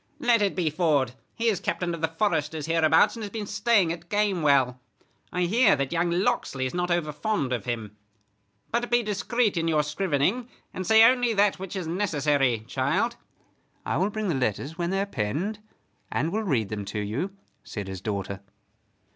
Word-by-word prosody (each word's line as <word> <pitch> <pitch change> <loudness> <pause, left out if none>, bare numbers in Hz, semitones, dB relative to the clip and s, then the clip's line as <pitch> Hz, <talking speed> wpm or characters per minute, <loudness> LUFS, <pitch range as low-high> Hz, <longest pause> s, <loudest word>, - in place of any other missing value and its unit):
"Let 240 -6 +3
it 200 -1 +1
be 170 -4 0
Ford; 150 -6 +2 0.2
he 230 - -1
is 210 -6 +2
captain 175 -1 -2
of 165 - -6
the 160 - +2
foresters 160 -4 -1
hereabouts, 160 +2 +4
and 230 - -7
has 210 - -4
been 215 0 -5
staying 200 -4 +2
at 170 0 -11
Gamewell. 150 -12 +2 0.5
I 180 0 0
hear 205 +2 +4
that 140 -1 -2
young 170 +1 +1
Locksley 170 -7 0
is 130 - -3
not 180 0 -1
over 175 -3 0
fond 150 -4 -1
of 120 -5 -3
him. 110 -4 -4 0.8
But 240 +1 0
be 240 0 +3
discreet 210 0 0
in 165 0 0
your 155 -2 +2
scrivening, 180 - 0 0.3
and 185 - -5
say 220 0 +7
only 245 -1 +4
that 200 -1 +3
which 190 0 -6
is 185 -3 -3
necessary, 145 - +1
child." 140 - 0 0.7
"I - - -1
will 195 - +1
bring 215 0 -3
the - - +1
letters 130 +3 -2
when 170 0 -2
they 195 +1 0
are - - 0
penned, 185 - -2 0.5
and 155 +5 0
will 215 +3 0
read 125 - 0
them 105 -1 -4
to 105 +2 -4
you," 125 - -3 0.3
said 100 -3 -6
his 95 -2 -6
daughter. 100 -2 -3
170 Hz, 190 wpm, -26 LUFS, 140-205 Hz, 0.8 s, say